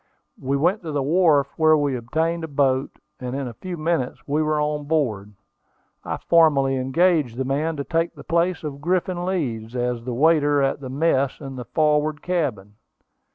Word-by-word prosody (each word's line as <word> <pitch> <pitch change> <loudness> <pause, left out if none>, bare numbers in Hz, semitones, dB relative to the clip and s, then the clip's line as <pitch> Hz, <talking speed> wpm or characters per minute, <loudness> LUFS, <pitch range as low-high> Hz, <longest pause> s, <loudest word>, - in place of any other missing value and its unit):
We 135 +2 0
went 180 +9 +1
to 165 -3 -6
the 145 -2 -1
wharf, 150 -2 +3
where 155 -1 +5
we 145 -3 0
obtained 160 +8 -1
a - - -3
boat, 135 -2 +1 0.3
and 125 0 -5
in 140 -1 -3
a 120 - -7
few 180 +8 -7
minutes 155 -5 -2
we 150 +2 +1
were 155 0 +1
on 150 0 -1
board. 115 -10 -1 0.7
I - - -3
formally 145 -5 +3
engaged 135 -1 +1
the 130 - -1
man 150 +5 -1
to 140 - -2
take 165 +3 -1
the - - -11
place 170 +1 0
of 140 -2 -6
Griffin 180 +1 -1
Leeds, 125 -11 -3
as 120 -1 -2
the 125 -1 -4
waiter 145 0 +3
at 135 0 +1
the 130 - -6
mess 140 -1 +1
in 135 -2 -8
the 125 -1 -7
forward 150 -1 +1
cabin. 115 - -2
145 Hz, 185 wpm, -23 LUFS, 130-165 Hz, 0.7 s, where